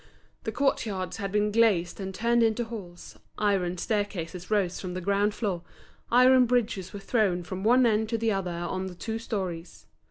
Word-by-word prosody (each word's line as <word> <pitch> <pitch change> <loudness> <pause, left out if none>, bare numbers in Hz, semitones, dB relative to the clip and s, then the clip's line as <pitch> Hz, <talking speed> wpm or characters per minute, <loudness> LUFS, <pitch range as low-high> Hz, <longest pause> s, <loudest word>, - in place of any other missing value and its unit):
The - - -1
court 280 -1 +1
yards 185 -3 -4
had 200 -2 -4
been 210 0 +1
glazed 205 -6 +2
and 190 -1 -4
turned 235 +4 +1
into 225 +1 +2
halls, 200 -7 -9 0.2
iron 190 -4 +1
staircases 185 -4 -3
rose 200 -4 +1
from 180 -2 -5
the - - -2
ground 200 +3 +1
floor, 195 -7 -2 0.5
iron 255 +1 +6
bridges 220 -6 0
were 205 - -7
thrown 195 -4 +1
from 185 +2 -6
one 245 +3 +5
end 220 -1 +2
to 230 - 0
the 225 0 +1
other 195 -3 -1
on 175 +2 -3
the 180 - -8
two 225 +5 -4
storeys. 185 -7 -5
205 Hz, 185 wpm, -27 LUFS, 185-225 Hz, 0.5 s, iron